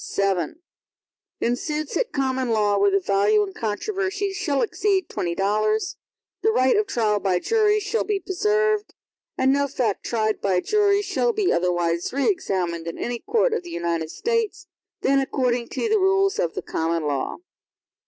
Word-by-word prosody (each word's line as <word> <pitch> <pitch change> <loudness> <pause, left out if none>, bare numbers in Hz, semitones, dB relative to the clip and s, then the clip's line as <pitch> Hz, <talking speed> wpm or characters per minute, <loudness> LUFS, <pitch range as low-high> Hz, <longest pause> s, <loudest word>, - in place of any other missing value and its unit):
VII 195 -5 0 0.8
In 240 - +1
suits 300 +3 -4
at - - 0
common 260 -2 -1
law, 210 -2 +2
where 200 0 +4
the 195 0 +2
value 200 +2 +2
in 195 - -9
controversy 385 - -2
shall 355 -9 0
exceed 395 -5 0
twenty 170 -1 -2
dollars, 215 +3 0 0.5
the 440 - +3
right 260 -10 +3
of 420 0 +1
trial 215 - +1
by 190 -3 +1
jury 425 - +2
shall 415 +3 -1
be 415 -2 -1
preserved, 425 +3 0 0.4
and 265 +1 +3
no 280 0 +1
fact 235 -6 -1
tried 220 -2 -1
by 195 -2 +1
a 180 - +2
jury 410 - +2
shall 465 +4 0
be 410 -3 +1
otherwise 175 -1 0
re 275 +1 0
examined 180 - -1
in 165 - -5
any 240 0 -3
court 470 - +1
of 455 - 0
the 350 - -11
United 170 - -2
States, 460 - -2 0.4
than 275 +1 +3
according 250 -3 0
to - - -2
the 435 -1 +3
rules 390 +2 +2
of - - -1
the - - -4
common 165 0 -1
law. 140 -3 -2
260 Hz, 175 wpm, -23 LUFS, -, 0.8 s, where